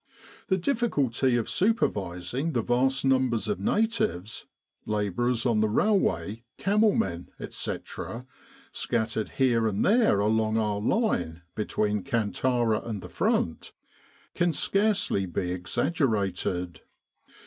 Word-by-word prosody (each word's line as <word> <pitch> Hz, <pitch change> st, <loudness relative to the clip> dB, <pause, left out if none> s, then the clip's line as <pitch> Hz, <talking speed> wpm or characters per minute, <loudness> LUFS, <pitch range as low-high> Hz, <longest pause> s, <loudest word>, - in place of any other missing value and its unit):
The 190 Hz, -, +2 dB
difficulty 145 Hz, -, +1 dB
of 120 Hz, -2 st, 0 dB
supervising 130 Hz, -, 0 dB
the 120 Hz, -, 0 dB
vast 130 Hz, +3 st, +1 dB
numbers 130 Hz, -4 st, +2 dB
of 105 Hz, -3 st, -1 dB
natives 110 Hz, -, -1 dB, 0.4 s
labourers 105 Hz, +4 st, 0 dB
on 115 Hz, -3 st, +2 dB
the 110 Hz, 0 st, +2 dB
railway, 115 Hz, -, +1 dB
camel 210 Hz, +1 st, +3 dB
men, 85 Hz, -2 st, -2 dB
etc. 120 Hz, +2 st, -5 dB, 0.5 s
scattered 110 Hz, -2 st, -1 dB
here 120 Hz, -4 st, +3 dB
and 105 Hz, -2 st, 0 dB
there 220 Hz, -, +4 dB
along 110 Hz, +1 st, +1 dB
our 105 Hz, -2 st, 0 dB
line 90 Hz, -, 0 dB
between 105 Hz, -1 st, -1 dB
Kantara 120 Hz, -1 st, 0 dB
and 110 Hz, -4 st, -5 dB
the -, -, -8 dB
Front, 80 Hz, -, -1 dB, 0.6 s
can 175 Hz, -1 st, +1 dB
scarcely 195 Hz, -, +1 dB
be 90 Hz, +1 st, -2 dB
exaggerated. 95 Hz, -, -1 dB
115 Hz, 110 wpm, -27 LUFS, 100-135 Hz, 0.6 s, there